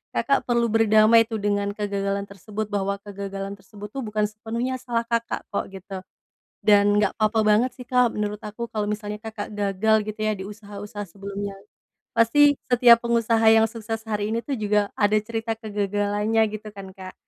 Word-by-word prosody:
Kakak 275 Hz, -, +1 dB
perlu 235 Hz, -1 st, +2 dB
berdamai 225 Hz, +1 st, +5 dB
tuh, 225 Hz, -1 st, -3 dB
dengan 205 Hz, 0 st, 0 dB
kegagalan 200 Hz, -1 st, -2 dB
tersebut 205 Hz, +2 st, -6 dB
bahwa 200 Hz, -1 st, 0 dB
kegagalan 195 Hz, -1 st, -6 dB
tersebut 205 Hz, +1 st, -11 dB
tuh, 275 Hz, -, -5 dB
bukan 215 Hz, 0 st, -1 dB
sepenuhnya 230 Hz, +4 st, -3 dB
salah 235 Hz, -2 st, -1 dB
Kakak 230 Hz, 0 st, -1 dB
kok, 200 Hz, -, -1 dB
gitu. 190 Hz, 0 st, -7 dB, 0.7 s
Dan 205 Hz, -1 st, +5 dB
nggak 205 Hz, -, +1 dB
apa-apa 220 Hz, 0 st, +2 dB
banget 220 Hz, +4 st, +4 dB
sih 250 Hz, -, -9 dB
Kak, 250 Hz, -2 st, +3 dB
menurut 210 Hz, 0 st, -3 dB
aku 215 Hz, +3 st, -5 dB
kalau 215 Hz, -2 st, -2 dB
misalnya 210 Hz, 0 st, -4 dB
Kakak 220 Hz, -2 st, -6 dB
gagal 205 Hz, +1 st, +1 dB
gitu 215 Hz, +1 st, -5 dB
ya, 215 Hz, 0 st, +1 dB
di 190 Hz, -, -6 dB
usaha-usaha 205 Hz, 0 st, -8 dB
sebelumnya. 200 Hz, +2 st, -6 dB, 0.6 s
Pasti 285 Hz, +5 st, +5 dB
setiap 240 Hz, -1 st, +6 dB
pengusaha 230 Hz, -1 st, +2 dB
yang 225 Hz, 0 st, +5 dB
sukses 225 Hz, 0 st, -5 dB
hari 210 Hz, -1 st, -2 dB
ini 230 Hz, -, 0 dB
itu 285 Hz, -, -3 dB
juga 210 Hz, -1 st, +1 dB
ada 210 Hz, 0 st, +4 dB
cerita 225 Hz, +1 st, -3 dB
kegagalannya, 205 Hz, 0 st, 0 dB, 0.2 s
gitu 215 Hz, 0 st, -10 dB
kan 195 Hz, -1 st, -9 dB
Kak. 185 Hz, -1 st, -9 dB
210 Hz, 170 wpm, -24 LUFS, 205-225 Hz, 0.7 s, setiap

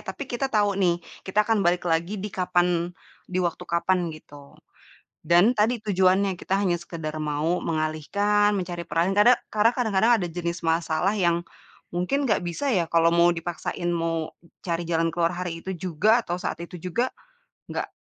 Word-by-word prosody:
Tapi 285 Hz, -, -5 dB
kita 245 Hz, +3 st, -1 dB
tau 205 Hz, -2 st, +3 dB
nih, 175 Hz, -2 st, +2 dB, 0.3 s
kita 210 Hz, +3 st, +2 dB
akan 225 Hz, -2 st, +2 dB
balik 175 Hz, +1 st, +2 dB
lagi 170 Hz, +5 st, 0 dB
di 210 Hz, -, -4 dB
kapan 175 Hz, -1 st, +1 dB, 0.4 s
di 185 Hz, -, -2 dB
waktu 175 Hz, +1 st, -2 dB
kapan 175 Hz, +1 st, +1 dB
gitu, 145 Hz, -2 st, -15 dB, 0.7 s
dan 175 Hz, +7 st, +5 dB
tadi 225 Hz, +3 st, +2 dB
tujuannya, 190 Hz, -1 st, +2 dB
kita 195 Hz, -, 0 dB
hanya 185 Hz, -3 st, +2 dB
sekedar 160 Hz, -3 st, -6 dB
mau 150 Hz, +4 st, 0 dB
mengalihkan, 200 Hz, +7 st, +1 dB
mencari 175 Hz, -2 st, -4 dB
peran. 170 Hz, +4 st, +1 dB
Kade 240 Hz, +4 st, +6 dB, 0.2 s
karena 215 Hz, +2 st, +4 dB
kadang-kadang 220 Hz, -1 st, +3 dB
ada -, -, 0 dB
jenis 170 Hz, +1 st, -3 dB
masalah 165 Hz, +3 st, +1 dB
yang 170 Hz, -2 st, +2 dB, 0.5 s
mungkin 270 Hz, +11 st, 0 dB
gak 215 Hz, -, +2 dB
bisa 175 Hz, +12 st, -2 dB
ya, 180 Hz, -5 st, +2 dB
kalau 165 Hz, 0 st, +4 dB
mau 170 Hz, 0 st, +5 dB
dipaksain 175 Hz, +1 st, -4 dB
mau 165 Hz, -1 st, -2 dB, 0.3 s
cari 170 Hz, -1 st, -2 dB
jalan 165 Hz, 0 st, +1 dB
keluar 170 Hz, +1 st, +1 dB
hari 175 Hz, -2 st, -4 dB
itu 190 Hz, -, -3 dB
juga, 185 Hz, +7 st, +2 dB
atau 175 Hz, -, -3 dB
saat -, -, -3 dB
itu 180 Hz, -, -10 dB
juga, 210 Hz, +9 st, -1 dB, 0.6 s
gak, -, -, -3 dB
175 Hz, 165 wpm, -25 LUFS, 170-200 Hz, 0.7 s, Kade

